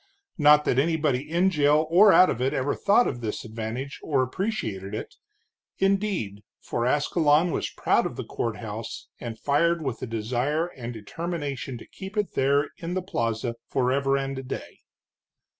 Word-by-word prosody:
Not 150 0 +6
that 125 - +2
anybody 150 -3 +1
in 175 +4 +3
jail 150 -1 +3
or 195 +4 +7
out 185 - +7
of 120 - -4
it 130 +1 +1
ever 135 +2 0
thought 205 +5 +3
of 120 - -4
this 110 0 -4
advantage, 115 +5 -5
or 140 -4 +1
appreciated 115 - -3
it, - - -6 0.6
indeed, 195 - 0 0.2
for 120 0 -2
Ascalon 150 +4 +3
was - - -2
proud - - +1
of - - -8
the - - -4
courthouse, 115 -1 -5
and 115 -2 -6
fired 165 +6 +1
with 130 -4 -3
a - - -3
desire 125 +8 -1
and 125 -7 -7
determination 140 +2 -5
to - - -11
keep 195 +2 -9
it 210 -2 0
there 140 +2 +2
in 175 +1 -4
the 185 - -1
plaza 115 - -2
forever 135 +1 +1
and 135 0 -3
a - - -7
day. 125 - -7
140 Hz, 165 wpm, -26 LUFS, 120-165 Hz, 0.6 s, or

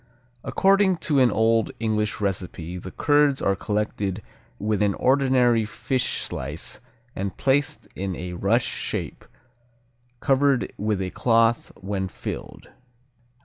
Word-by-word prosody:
According 195 -1 +3
to 145 -3 +3
an 125 -2 +5
old 115 +1 +2
English 110 -2 0
recipe 90 -3 -3
the 90 - -8
curds 145 - +3
are 100 - +1
collected 105 -1 -2 0.3
with 105 0 -1
an 100 -2 +2
ordinary 130 -3 +3
fish 125 +4 -1
slice 75 +5 -5 0.4
and 95 0 -4
placed 140 +1 +1
in 95 -1 -3
a 90 +1 -6
rush 100 +7 +2
shape, - - -4 1.0
covered 135 -1 +2
with 105 -2 -1
a 90 - -4
cloth 115 -1 +2
when 95 -1 -2
filled. 90 - -7
110 Hz, 120 wpm, -24 LUFS, 95-130 Hz, 1.0 s, an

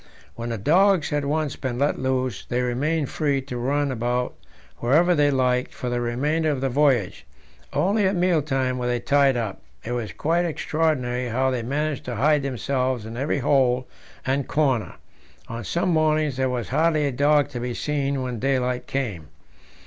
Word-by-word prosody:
When 115 0 -5
the 115 - -2
dogs 175 - +3
had 145 -1 0
once 150 0 -1
been 130 -3 -4
let 140 +3 +1
loose, 130 -4 -1
they 125 +1 -1
remained 140 +5 -1
free 145 -3 0
to 130 -2 -7
run 140 +3 0
about 125 +1 -1 0.4
wherever 160 +9 +3
they 145 -3 +3
liked 125 -2 +1
for 125 - -4
the 120 0 -1
remainder 145 +7 0
of 145 -3 0
the 135 0 0
voyage; 130 -7 +1 0.5
only 200 +2 +2
at 195 - 0
meal 175 -3 +2
times 135 -3 -1
were 125 - -2
they 120 0 0
tied 140 0 +3
up. 110 -5 -3 0.2
It 115 - -4
was 120 -5 -3
quite 165 +3 0
extraordinary 150 -7 -1
how 130 +3 +1
they 125 -2 -1
managed 145 +4 -2
to 125 - -4
hide 145 +5 +3
themselves 130 -2 -1
in 115 +1 -7
every 140 +5 -1
hole 125 -2 +2 0.4
and 135 +1 0
comer; 135 -7 0 0.5
on 115 0 -6
some 175 - -1
mornings 155 -3 +2
there 130 0 0
was 120 -6 -3
hardly 155 -2 +2
a 140 - 0
dog 145 +2 +3
to 125 -4 -5
be 120 0 -3
seen 140 -2 -1
when 125 -3 -4
daylight 125 -1 0
came. 105 - -3
135 Hz, 180 wpm, -24 LUFS, 125-150 Hz, 0.5 s, dogs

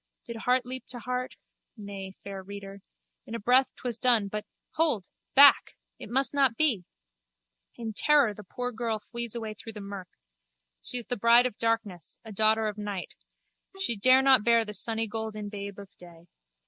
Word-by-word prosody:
Did 235 - -7
heart 250 +2 +1
leap 255 +1 -7
to 250 - -3
heart? 250 +1 -4 0.4
Nay, 195 -2 -8
fair 195 -1 -7
reader. 200 0 -10 0.5
In 230 - -6
a - - -4
breath 250 +5 +3
'twas 240 -3 -4
done 230 -5 +3
but—hold! 215 - -2 0.3
Back! 280 0 +7 0.2
It - - -9
must 265 +4 +1
not 270 -5 +2
be! 245 - +1 0.9
In 225 -2 -6
terror 285 -2 +4
the 210 - -11
poor 245 +6 -5
girl 225 -1 -2
flees 235 +1 -4
away 220 -2 -4
through 225 +1 -10
the 210 - -8
murk. 200 -2 -7 0.7
She 250 - -3
is 240 - -5
the 245 - -3
bride 235 +3 +6
of 250 -5 -4
darkness, 225 -7 -2
a 220 - -9
daughter 220 +1 +2
of 210 0 -5
night. 205 -3 -5 0.7
She 310 -12 0
dare 255 +6 +5
not 265 -5 +5
bear 230 0 +4
the 210 - -7
sunnygolden 220 0 -2
babe 200 -1 -7
of 200 -1 -12
day. 170 -1 -15
225 Hz, 175 wpm, -28 LUFS, 205-245 Hz, 0.9 s, Back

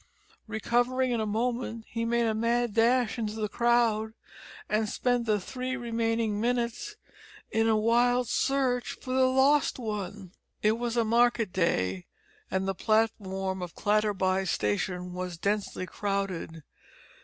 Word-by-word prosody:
Recovering 245 +3 +1
in 235 -2 0
a 215 - -1
moment 230 +1 -2
he 230 0 -3
made 235 0 +1
a 230 +2 +1
dash 235 +2 +2
into 215 -1 -2
the 215 -1 -1
crowd 225 -1 +1 0.5
and 215 0 0
spent 245 0 0
the 210 -1 +2
three 255 +5 -4
remaining 225 -3 -1
minutes 245 - -1 0.6
in 225 0 +2
a 220 - +4
wild 240 +3 +3
search 260 -3 0
for 255 - -5
the 260 0 +4
lost 270 +3 +3
one! 205 -5 -5 0.3
It 215 +2 +3
was 240 0 -2
a 230 - +3
market 235 -2 +2
day, 95 - 0 0.4
and 190 +1 -1
the 195 - 0
platform 195 -3 0
of 175 -2 -6
Clatterby 200 -3 +1
station 180 - -1
was 180 -1 -5
densely 200 0 -1
crowded. 195 -5 -3
225 Hz, 135 wpm, -28 LUFS, 200-240 Hz, 0.6 s, a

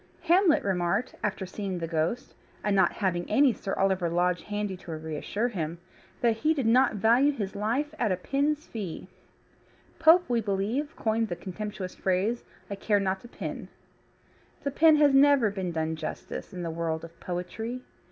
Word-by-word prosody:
Hamlet 350 -1 +4
remarked, 185 +4 0
after 195 -2 -1
seeing 190 0 -4
the 170 - -3
ghost, 165 +8 -2 0.3
and 205 -1 +1
not 190 - +4
having 180 -3 -1
any 270 +3 +4
Sir 195 -1 -4
Oliver 190 -3 +1
Lodge 175 0 +1
handy 205 -2 -3
to 175 - -10
reassure 160 +8 -3
him, 170 -6 -4 0.4
that 230 -3 +2
he 310 +6 +2
did 270 -5 -1
not 245 +1 +4
value 235 +7 +4
his 205 -8 -4
life 245 +9 -1
at 220 -5 +1
a 185 - +1
pin's 290 - 0
fee. 200 -8 -6 0.9
Pope, 330 +3 +6
we 240 -2 +1
believe, 220 +9 -2
coined 225 0 0
the 175 - -3
contemptuous 195 0 -6
phrase, 195 +6 0 0.2
"I - - -5
care 205 +1 +2
not 190 -1 -1
a - - -10
pin." - - -6 1.0
The 280 - -1
pin 315 +2 +6
has 295 -2 +5
never 270 -5 +5
been 190 -3 -3
done 160 -1 -1
justice 160 - -6
in 180 -1 -6
the 165 - -3
world 160 -1 -2
of 165 0 -12
poetry. 220 +8 -4
205 Hz, 170 wpm, -28 LUFS, 180-250 Hz, 1.0 s, Pope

